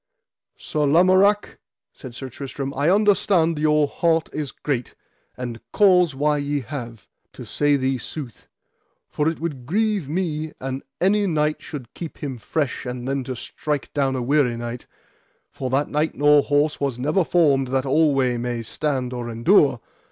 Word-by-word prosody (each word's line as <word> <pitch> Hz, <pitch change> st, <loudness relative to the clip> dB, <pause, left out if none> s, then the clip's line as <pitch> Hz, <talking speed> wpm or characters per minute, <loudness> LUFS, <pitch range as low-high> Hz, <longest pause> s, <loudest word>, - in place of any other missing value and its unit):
Sir 150 Hz, -1 st, -1 dB
Lamorak, 185 Hz, +6 st, +3 dB, 0.3 s
said 125 Hz, -2 st, -11 dB
Sir 135 Hz, -, -6 dB
Tristram, 135 Hz, +2 st, -6 dB
I 145 Hz, +4 st, +1 dB
understand 190 Hz, -5 st, +3 dB
your 150 Hz, -1 st, +3 dB
heart 165 Hz, +1 st, +1 dB
is 150 Hz, -4 st, -3 dB
great, 130 Hz, -5 st, -3 dB, 0.4 s
and 120 Hz, -2 st, -6 dB
cause 180 Hz, -7 st, +4 dB
why 150 Hz, +2 st, +1 dB
ye 145 Hz, 0 st, -1 dB
have, 120 Hz, -4 st, -8 dB, 0.3 s
to -, -, -9 dB
say 145 Hz, 0 st, +2 dB
thee 130 Hz, -1 st, 0 dB
sooth; 130 Hz, -1 st, -8 dB, 0.6 s
for 150 Hz, +1 st, +1 dB
it 165 Hz, -, -5 dB
would 145 Hz, -7 st, -5 dB
grieve 205 Hz, -3 st, 0 dB
me 155 Hz, -2 st, -2 dB
an 135 Hz, +1 st, -4 dB, 0.2 s
any 200 Hz, +2 st, +2 dB
knight 155 Hz, -3 st, 0 dB
should 140 Hz, -8 st, -8 dB
keep 165 Hz, -3 st, -7 dB
him 135 Hz, -4 st, -5 dB
fresh 145 Hz, +3 st, -2 dB
and 125 Hz, 0 st, -5 dB
then 135 Hz, 0 st, -1 dB
to 130 Hz, -, -4 dB
strike 145 Hz, +4 st, -4 dB
down 135 Hz, -2 st, +1 dB
a 125 Hz, -, -2 dB
weary 130 Hz, -2 st, +2 dB
knight, 120 Hz, +1 st, -6 dB, 0.6 s
for 130 Hz, -, -4 dB
that 135 Hz, +3 st, +1 dB
knight 150 Hz, +2 st, -1 dB
nor 145 Hz, 0 st, +5 dB
horse 145 Hz, +1 st, +1 dB
was 140 Hz, -4 st, -1 dB
never 150 Hz, +9 st, +1 dB
formed 145 Hz, -6 st, +3 dB
that 130 Hz, +1 st, 0 dB
alway 135 Hz, -3 st, +2 dB
might 120 Hz, -1 st, -3 dB
stand 130 Hz, -1 st, -2 dB
or 120 Hz, -1 st, -4 dB
endure. 125 Hz, -, +3 dB
145 Hz, 160 wpm, -22 LUFS, 130-160 Hz, 0.6 s, nor